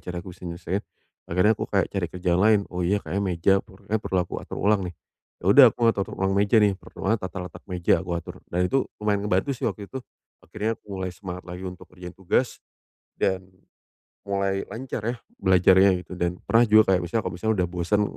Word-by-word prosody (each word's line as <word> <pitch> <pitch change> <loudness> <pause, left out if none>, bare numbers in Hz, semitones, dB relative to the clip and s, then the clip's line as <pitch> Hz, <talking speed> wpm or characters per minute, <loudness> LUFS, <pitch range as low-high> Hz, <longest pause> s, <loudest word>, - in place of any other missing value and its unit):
cara 90 -1 -5
aku 95 - -8
bisa 90 0 -9
nyelesain" 85 +3 -3 0.5
akhirnya 90 +5 +4
aku - - -3
kayak 95 -2 +1
cari 95 -3 -1
kerjaan 90 0 0
yang - - +3
lain, 105 -1 +5
"oh 90 - -3
iya 100 +3 +1
kayak 100 - -2
meja 95 0 +2
per 95 -3 -18 0.2
perlu 95 - -3
aku - - -6
atur - - -8
ulang 105 0 +3
nih." 90 - -9 0.5
Ya - - -3
udah - - +10
aku - - -34
ngatur 100 -4 -1
ulang 95 0 0
meja 100 +3 +3
nih, 105 -1 +4
pertama 105 +3 -2
tata 95 +1 -6
letak 90 - -10
meja 90 -2 +2
aku 90 0 -7
atur 85 - -8
dan 90 +1 0
itu 135 +7 +1
lumayan 105 -1 +1
ngebantu 95 +9 +1
sih - - -1
waktu 100 - -6
itu. 130 - -6 0.4
Akhirnya 110 +6 -2
aku - - -50 0.2
mulai 95 -1 -2
semangat 90 -1 -8
lagi 90 +1 -8
untuk 90 -1 -10
ngerjain 90 -1 -10
tugas 95 -2 0 0.6
dan 95 -1 +1 0.8
mulai 100 -1 -1
lancar 125 -1 -6
ya, 120 - 0 0.2
belajarnya 95 +1 +5
gitu, - - -13
dan 85 0 -1
pernah 115 +1 +4
juga 105 -4 +5
misalnya 90 +5 -1
kalau - - -3
misalnya 110 +3 +1
udah - - -3
bosen. 90 +4 +1
95 Hz, 210 wpm, -25 LUFS, 90-105 Hz, 0.8 s, udah